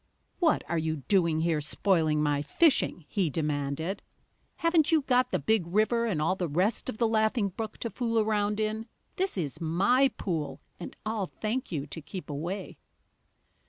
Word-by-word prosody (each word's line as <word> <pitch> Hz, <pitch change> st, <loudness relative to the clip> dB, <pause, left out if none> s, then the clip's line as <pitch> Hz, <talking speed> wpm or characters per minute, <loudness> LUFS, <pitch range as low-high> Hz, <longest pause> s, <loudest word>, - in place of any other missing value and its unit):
"What 330 Hz, -4 st, +3 dB
are 170 Hz, -, 0 dB
you 160 Hz, 0 st, -1 dB
doing 165 Hz, +1 st, +1 dB
here, 160 Hz, -2 st, +1 dB
spoiling 155 Hz, -1 st, +1 dB
my 145 Hz, -1 st, +1 dB
fishing?" 185 Hz, -, +2 dB
he 185 Hz, -2 st, 0 dB
demanded. 150 Hz, +4 st, -2 dB, 0.5 s
"Haven't 335 Hz, -2 st, +2 dB
you 315 Hz, -3 st, +4 dB
got 255 Hz, -2 st, +2 dB
the -, -, +1 dB
Big 220 Hz, -6 st, +1 dB
River 220 Hz, +5 st, +2 dB
and 185 Hz, -9 st, -1 dB
all 165 Hz, +5 st, +1 dB
the 180 Hz, -2 st, -2 dB
rest 185 Hz, +9 st, 0 dB
of -, -, -4 dB
the 230 Hz, -, +2 dB
Laughing 220 Hz, -1 st, +2 dB
Brook 220 Hz, +4 st, -6 dB
to 230 Hz, -, -3 dB
fool 230 Hz, -2 st, -1 dB
around 210 Hz, -1 st, +1 dB
in? 215 Hz, +1 st, -2 dB, 0.3 s
This 380 Hz, -, 0 dB
is 155 Hz, -3 st, -3 dB
my 200 Hz, +12 st, +3 dB
pool, 160 Hz, -7 st, -3 dB, 0.2 s
and 175 Hz, -, -7 dB
I'll 215 Hz, -3 st, -1 dB
thank 225 Hz, +6 st, -3 dB
you 145 Hz, -4 st, -2 dB
to 155 Hz, +3 st, -7 dB
keep 175 Hz, +1 st, -7 dB
away!" 175 Hz, +7 st, -5 dB
195 Hz, 170 wpm, -29 LUFS, 160-225 Hz, 0.5 s, you